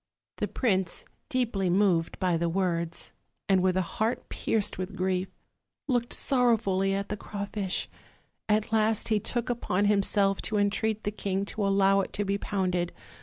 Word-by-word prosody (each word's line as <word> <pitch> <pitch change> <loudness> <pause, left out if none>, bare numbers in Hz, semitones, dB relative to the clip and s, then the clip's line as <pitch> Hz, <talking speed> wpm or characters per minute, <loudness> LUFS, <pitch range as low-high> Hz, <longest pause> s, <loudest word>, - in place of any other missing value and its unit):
The - - -1
prince, 190 -8 0 0.2
deeply 230 -9 0
moved 175 -3 +2
by 180 -2 +1
the 170 +1 0
words, 170 -2 -1 0.3
and 190 -2 +4
with 185 0 +2
a 185 - +2
heart 220 +7 -2
pierced 210 -3 -1
with 185 +2 -4
grief, 185 0 0 0.6
looked 245 -3 0
sorrowfully 215 -7 +2
at 200 0 -3
the 210 - -1
crawfish; 200 -2 -3 0.6
at 215 +1 +1
last 220 0 +2
he 215 -1 +3
took 240 +3 -2
upon 205 -5 0
himself 200 -1 +3
to 215 - -2
entreat 210 +2 0
the 205 - -1
king 195 -1 -2
to 205 0 -2
allow 195 0 +4
it - - -6
to 205 - -1
be 200 +1 0
pounded. 180 -4 -1
200 Hz, 160 wpm, -28 LUFS, 185-215 Hz, 0.6 s, and